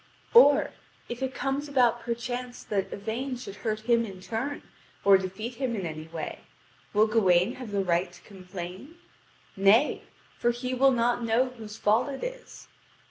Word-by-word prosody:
Or, 300 - +7 0.4
if 240 +2 -5
it 265 0 -2
comes 280 +2 -2
about 245 -4 +3
perchance 245 +1 -4
that 195 -2 -2
Yvain 235 +6 -3
should 205 -5 -9
hurt 215 -1 -2
him 235 +1 +3
in 195 -4 -8
turn, 230 +9 -4 0.4
or 200 -1 +8
defeat 190 +5 -2
him 255 -3 -1
in 195 -4 -3
any 155 -1 -6
way, 160 -1 -6 0.5
will 210 +1 +4
Gawain 190 -5 +3
have 250 -3 -7
the 200 -1 0
right 175 0 +1
to 175 - -16
complain? 185 - -9 0.6
Nay, 200 +9 +4 0.4
for 240 - +2
he 250 +2 -2
will 270 +2 +5
not 240 -1 +1
know 230 +3 +2
whose 220 -4 -10
fault 225 +7 +2
it 270 - -6
is. - - -8
230 Hz, 165 wpm, -27 LUFS, 195-255 Hz, 0.6 s, or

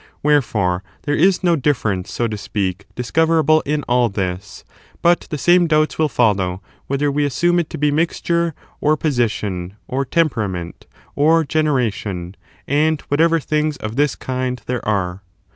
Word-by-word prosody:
Wherefore, 110 -11 +2 0.2
there 145 - -1
is 185 +4 +3
no 175 -2 +4
difference, 110 - -1
so 120 - -1
to 110 - -4
speak, 100 -2 -3
dis 125 -1 -5
coverable 160 -1 +3
in 150 0 0
all 125 -1 +2
this; 95 0 -4 0.4
but 175 0 +3
the 150 - -3
same 175 +3 +4
doubts 155 -1 +1
will 155 -1 +3
follow 100 -8 +1 0.3
whether 140 +1 0
we 145 +1 0
assume 175 +6 +2
it 170 - -2
to - - -6
be 150 0 +2
mixture, 170 +1 0 0.2
or 155 +1 +2
position, 105 - -1
or 135 +2 -1
temperament, 110 - -2 0.3
or 160 +3 +4
generation, 115 - -1 0.3
and 155 +2 +1
whatever 165 +3 +3
things 150 +1 -1
of 110 +1 -6
this 145 0 +1
kind 130 -2 -3
there 125 -1 -3
are. 95 -3 -1
140 Hz, 155 wpm, -19 LUFS, 105-155 Hz, 0.4 s, no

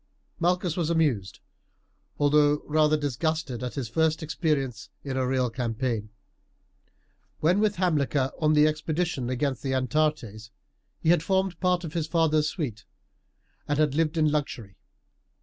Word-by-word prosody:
Malchus 175 -1 +1
was 170 -3 -1
amused, 140 - 0 0.8
although 145 0 +3
rather 155 0 +3
disgusted 145 -2 -2
at 125 -1 -5
his 135 -5 -3
first 160 +6 0
experience 145 - -2
in 135 -2 -4
a 130 -1 0
real 130 -1 +1
campaign. 115 -2 -2 1.3
When 175 +6 +3
with 210 -1 +2
Hamilcar 145 -7 +1
on 155 -1 +3
the 150 0 +5
expedition 155 -3 -1
against 130 0 -1
the 135 -1 -2
Atarantes 130 -6 -1 0.5
he 160 - 0
had 175 -2 +5
formed 190 0 0
part 180 -1 +1
of 160 -2 -6
his 165 -3 -1
father's 155 -2 +2
suite 120 - -5 0.8
and 145 - 0
had 150 -2 +2
lived 160 +2 0
in 155 -1 +3
luxury. 120 -9 -3
150 Hz, 140 wpm, -26 LUFS, 130-160 Hz, 1.3 s, the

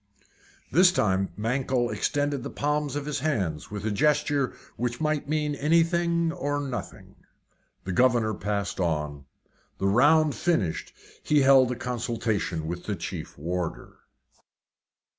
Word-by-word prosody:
This 180 +5 +6
time 95 - +1
Mankell 120 +2 0
extended 145 +6 -1
the 140 - -5
palms 150 -1 -1
of 145 -1 -3
his 150 -1 -2
hands 95 - -2
with 105 0 -6
a 110 - 0
gesture 145 +2 +2 0.2
which 120 0 -3
might 155 -2 -1
mean 150 -1 0
anything 170 +3 +2
or 145 -4 -2
nothing. 135 -4 -6 0.7
The 95 - -4
governor 120 0 +3
passed 100 +2 -3
on. 75 -5 -2 0.5
The - - -2
round 145 +9 +4
finished, 115 - -1 0.3
he 150 -1 +3
held 135 -2 +6
a - - -2
consultation 115 -8 -2
with 85 +2 -5
the 105 - -2
chief 85 -1 -6
warder. 85 +3 -4
125 Hz, 130 wpm, -26 LUFS, 100-150 Hz, 0.7 s, This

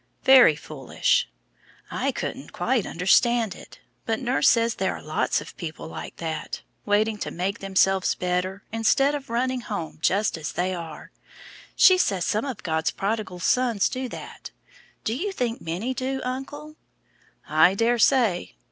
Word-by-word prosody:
"Very 260 - +7
foolish." 145 -3 -1 0.6
"I - - -1
couldn't - - -6
quite - - 0
understand 220 +4 +2
it, - - -14 0.3
but 225 -1 0
nurse 260 +2 +3
says 230 -1 +3
there - - -1
are - - -10
lots - - 0
of - - -11
people 160 -3 -6
like - - -8
that, 160 -2 -5 0.2
waiting 210 +1 +2
to - - -3
make 185 +3 -3
themselves 195 -1 +2
better, 180 +2 -2
instead 225 +6 +2
of 285 -4 -5
running 250 +2 -1
home 200 -11 -5
just 200 -2 +1
as 155 - -5
they 185 +1 -1
are. 170 -3 -8 0.6
She 370 -1 +6
says 190 - +1
some 215 +5 0
of 260 -6 -6
God's 160 -1 0
prodigal 200 -3 -3
sons 235 0 +2
do 255 0 -4
that; - - -9 0.5
do 220 - -1
you 390 +9 -2
think 245 -7 -3
many 185 +11 -3
do, 265 +1 -3
uncle?" 290 +4 -6 0.7
"I 185 - +4
daresay." 230 - +2
215 Hz, 150 wpm, -25 LUFS, 180-255 Hz, 0.7 s, Very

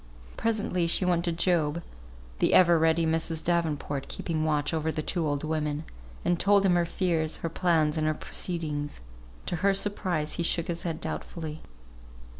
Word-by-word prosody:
Presently 205 -6 0
she 175 +2 +2
went 175 -1 +1
to 170 - +1
Job 170 -2 +1 0.6
(the - - +3
ever 170 -2 +6
ready 160 +1 +3
Mrs. 160 0 0
Davenport 155 -5 -1
keeping 160 -2 -3
watch 150 -1 0
over 160 0 0
the 155 - -3
two 170 -2 -1
old 145 0 -1
women), 155 -1 -2 0.4
and 175 -1 +2
told 200 0 +4
him 185 - +4
her 175 -1 +3
fears, 165 -4 0
her - - 0
plans, 165 -3 +1
and 155 - +1
her 155 - +1
proceedings. 150 - -2 0.4
To 175 - -2
her 195 +3 +2
surprise 185 -6 0
he - - -2
shook 170 0 0
his 170 0 -2
head 165 -2 -4
doubtfully. 160 -2 -5
165 Hz, 170 wpm, -28 LUFS, 155-175 Hz, 0.6 s, ever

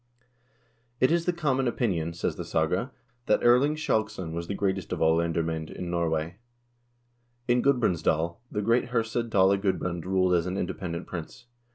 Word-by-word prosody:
" - - -39 0.3
It 130 - +4
is 170 0 +2
the 180 - +2
common 135 -6 0
opinion," 90 -9 -1
says 85 - -2
the - - -5
saga, 90 - 0 0.2
" 120 0 -41
that - - +2
Erling 125 +5 +5
Skjalgsson 110 - -1
was 85 0 -4
the 100 - -3
greatest 95 -2 -1
of - - -2
all 80 0 +4
lendermcend 80 -1 -1
in 90 -1 -5
Norway." 85 0 -1 1.1
In 120 0 +3
Gudbrandsdal 85 - +1
the 105 - -2
great 115 +5 +3
herse 115 -2 -1
Dale 100 -5 +3
Gudbrand 90 -3 -1
ruled 95 -1 +2
as 85 0 +2
an 90 +1 -2
independent 90 -3 -4
prince. 85 +5 -8
95 Hz, 170 wpm, -27 LUFS, 85-120 Hz, 1.1 s, Erling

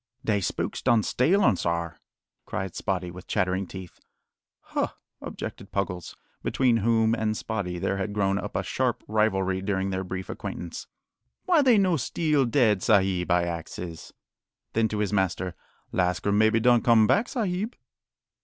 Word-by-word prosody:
"Dey 105 -2 +1
spooks 90 - -2
done 115 -2 +3
steal 180 - +2
urn, 120 - +5
sar," 85 -2 -2 0.5
cried 95 -2 -4
Spottie, 90 -3 -2
with 90 +1 -11
chattering 95 +1 0
teeth. 95 -2 -10 0.6
"Huh," - - -1 0.3
objected - - -7
Puggles, 90 -3 -3 0.3
between 125 -3 +2
whom 115 0 +2
and 110 -1 0
Spottie 95 -6 -3
there 100 +2 -1
had 100 +2 -2
grown 100 -1 +1
up - - -6
a - - 0
sharp - - -1
rivalry 95 -3 +1
during 95 -1 -1
their 95 0 -2
brief 95 0 -5
acquaintance, 85 -1 -6 0.6
"why 345 -4 +4
they 255 -5 +5
no 185 -4 +3
steal 150 +1 +1
dead 115 -6 +3
sahib? 95 -4 +2
I 90 0 +3
axes." 85 0 -6 0.6
Then 115 0 +2
to 110 - -4
his 105 0 -1
master: 95 -2 0 0.4
"Lascar 90 +2 0
maybe 110 +2 +4
done 120 0 +4
come 115 -2 +5
back, 215 - +2
sahib." 215 -2 -2
100 Hz, 155 wpm, -26 LUFS, 95-115 Hz, 0.6 s, urn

